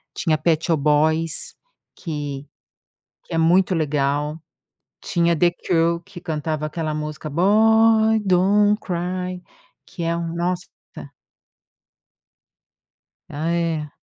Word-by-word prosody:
tinha 155 -3 +1
Pet 160 0 +1
Shop 160 -4 +1
Boys 155 +2 +1 0.4
que 145 -4 -5 0.8
que - - -9
é - - 0
muito 180 +3 +3
legal, 150 0 -1 0.6
tinha 170 -2 +1
The 175 +1 +3
Cure 170 -1 0
que 200 -3 -11
cantava 155 -2 -3
aquela 155 0 -3
música 155 0 -5
Boy 220 +5 +4
don't 205 +2 +3
cry, 180 0 -4 0.4
que 175 -3 -7
é 165 0 0
um 165 -1 -4
nossa 180 +1 -2 2.6
Ah, 155 +2 -3
é. 165 -3 -2
170 Hz, 105 wpm, -21 LUFS, 155-180 Hz, 2.6 s, Boy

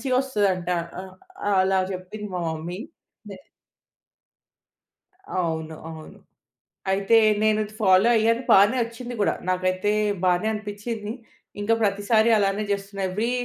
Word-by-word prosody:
మంచిగా 255 -2 0
వస్తదంట. 200 -9 0 0.3
ఆహ్, 190 -1 -12 0.5
అలా 190 0 +2
చెప్పింది 185 +3 -7
మా 180 - -2
మమ్మీ. 160 +3 -5 0.5
నె 195 - -8 2.0
అవును. 160 -2 -2
అవును. 160 -1 -11 0.7
అయితే 200 +4 +3 0.3
నేను 215 0 +3
అది 210 0 -10
ఫాలో 190 +3 +5
అయ్యాను. 230 +2 +2
బానే 205 +6 +6
వచ్చింది 240 +1 -8
కూడా. - - +2 0.2
నాకైతే 185 +2 0 0.3
బానే 180 +3 +2
అనిపిచ్చింది. 210 +1 -5 0.5
ఇంకా 225 +2 +2
ప్రతిసారి 210 +3 +2
అలానే 200 +1 +1
చేస్తున్నా. 200 0 -3
ఏవ్రీ 220 +6 -1
200 Hz, 115 wpm, -24 LUFS, 185-215 Hz, 2.0 s, బానే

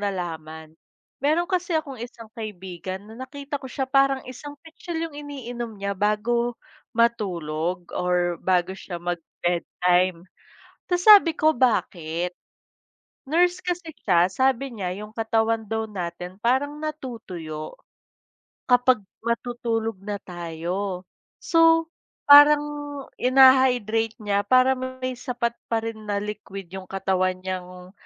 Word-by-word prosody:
nalaman. 160 -5 -5 0.5
Mayro'n 310 +5 +2
kasi 360 -2 -1
akong 275 -6 -4
isang 230 -2 -9
kaibigan 190 -3 -7
na 215 - -13 0.2
nakita 285 0 -6
ko 265 - -8
siya 265 +1 -2
parang 275 0 +2
isang 285 +3 -9
pitsel 325 +1 -7
yung 325 - -6
iniinom 245 -6 -6
niya 200 0 -2
bago, 225 +4 0 0.4
matulog 180 -7 0
or 180 -1 0
bago 185 0 +1
siya 190 -2 -7
mag 175 0 -3 0.2
bedtime, 175 0 +1 0.6
ta's 355 0 0
sabi 400 -7 +8
ko, 310 0 +4
"bakit?" 180 - 0 0.9
Nurse 350 +5 +2
kasi 350 -3 -4
siya 175 -7 +3
sabi 260 +6 +1
niya, 185 -4 -3
yung 210 +1 -9
katawan 225 0 +1
daw 220 +1 -3
natin 180 -2 -6
parang 285 +5 +1
natutuyo 225 - -6 0.9
kapag 250 0 +4 0.2
matutulog 230 -2 -2
na 205 0 -4
tayo 180 +2 -4 0.4
so 330 -1 +5 0.4
parang, 290 +1 +9 0.6
ina-hydrate 250 -4 +5
niya 200 0 0
parang 255 +1 +4 0.2
may 255 - 0
sapat 245 -3 -1 0.2
pa 225 -1 0
rin 220 -1 -6
na 205 0 -1
liquid 195 -3 -7
yung 190 -1 -7
katawan 185 -1 0
niyang 180 -1 -6
225 Hz, 120 wpm, -24 LUFS, 185-265 Hz, 0.9 s, parang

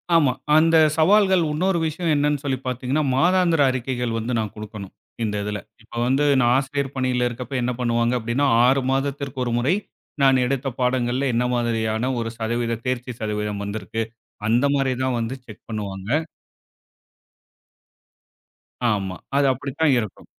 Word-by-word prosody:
ஆமா, 145 -6 +5 0.3
அந்த 165 +1 +4 0.2
சவால்கள் 190 +2 +4
இன்னொரு 175 +4 +1
விஷயம் 160 +1 -1
என்னன்னு 145 -1 +1
சொல்லிப் 135 -2 -2
பாத்தீங்கன்னா, 130 +4 -1
மாதாந்திர 175 +1 +3
அறிக்கைகள் 125 -2 -2
வந்து 115 +2 -2
நான் 110 -2 -3
குடுக்கணும், 105 -2 -8 0.3
இந்த 105 -1 -1
இதுல. 105 0 -3 0.2
இப்ப 110 - -21
வந்து 135 +3 +2 0.2
நான் 120 0 +4
ஆசிரியர் 140 0 -2
பணியில 125 -1 +1
இருக்கப்ப, 120 +2 -7
என்ன 125 +1 0
பண்ணுவாங்க 120 0 +1
அப்படின்னா, 120 +5 0 0.2
6 130 +1 +3
மாதத்திற்கு 135 0 -2
ஒரு 120 - -1
முறை 140 +10 +2 0.5
நான் 130 -1 +5
எடுத்த 135 +1 -1
பாடங்கள்ல 125 +1 +1
என்ன 120 - +2
மாதிரியான 115 +1 0
ஒரு 115 0 -3
சதவீதம், 115 0 -2
தேர்ச்சி 125 0 -2
சதவீதம் 105 -1 -3
வந்திருக்கு, 110 +2 -3 0.5
அந்த 120 +4 +3
மாதிரி 135 -2 +1
தான் 130 -2 0
வந்து 115 +3 -2
செக் 110 -2 -13
பண்ணுவாங்க. 100 -2 -5 2.8
ஆமா, 95 -3 -2 0.2
அது 140 - +4
அப்படித்தான் 140 +4 0
இருக்கும். 110 -4 -7
125 Hz, 140 wpm, -23 LUFS, 115-140 Hz, 2.8 s, ஆமா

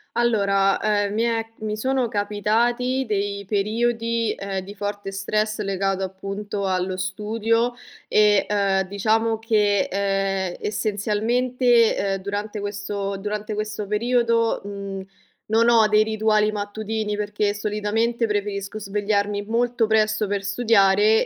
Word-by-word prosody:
Allora, 200 -4 +2
ehm, 205 -1 +1
mi 225 +2 +1
è 230 -1 0
mi 215 0 -3
sono 260 +1 0
capitati 230 +5 0
dei 200 -1 -2
periodi, 230 +3 0
ehm, 195 -1 -4
di 195 +2 -9
forte 205 -1 -4
stress 215 +2 -1
legato, 195 -1 -1
appunto, 195 +2 -4
allo 185 0 -1
studio, 220 +5 0 0.3
ehm, 205 -2 +3
diciamo 220 +3 +1
che, 210 -3 +2
ehm, 195 -2 0
essenzialmente, 225 +4 +1
ehm, 195 -1 -1
durante 205 +2 -4
questo 205 -1 -4
durante 210 +2 -4
questo 215 0 -3
periodo, 230 +2 +1
mhmm, 200 -1 -6 0.4
non 230 +2 +4
ho 225 -2 +5
dei 215 0 +4
rituali 215 -1 +2
mattutini, 210 +1 -3
perché 205 0 -1
solitamente 215 +3 -1
preferisco 205 -1 -3
svegliarmi 205 0 -1
molto 235 +1 +1
presto 215 -1 +2
per 200 0 -2
studiare 205 0 +3
210 Hz, 120 wpm, -23 LUFS, 200-225 Hz, 0.4 s, ho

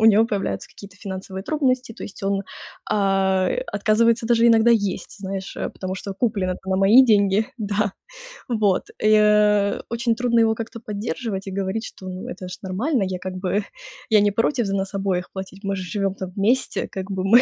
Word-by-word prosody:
у - - +3
него 220 +1 +6
появляются 195 - -3
какие-то 200 -2 -13
финансовые 190 -1 -6
трудности, 255 -5 0
то - - -11
есть 195 - -9
он, 195 0 0 0.5
а, 195 -2 +2 0.2
отказывается 225 +3 +2
даже 235 0 +4
иногда 230 +1 +5
есть, 205 -3 -1
знаешь, 195 0 -5 0.2
потому 185 0 -4
что 195 +1 -6
куплено-то 190 -4 -1
на 190 - +2
мои 210 +7 +7
деньги, 205 -2 +3
да, 205 -1 -1 0.6
вот. 210 -5 +2 0.2
И, - - +4
э, 210 -1 +3
очень 235 0 0
трудно 235 0 +2
его 225 -1 +4
как-то 230 +1 -6
поддерживать 210 -1 -4
и 195 - -4
говорить, 195 +3 -2
что 185 - -10
"ну 185 0 -7
это 185 0 -7
же 180 - -7
нормально, 215 +7 0
я 185 -1 -3
как 185 0 -5
бы 190 +2 -1 0.5
я 215 -1 +6
не 205 0 +3
против 230 +1 +1
за 195 - -1
нас 195 0 -2
обоих 195 -2 -1
платить, 190 +1 -8
мы 195 0 -1
же 185 - -4
живем 195 +2 -1
там 190 -2 -6
вместе, 230 +7 +1
как 190 +1 -6
бы 190 -1 -2
мы 230 +5 +7
200 Hz, 190 wpm, -22 LUFS, 190-225 Hz, 0.6 s, мои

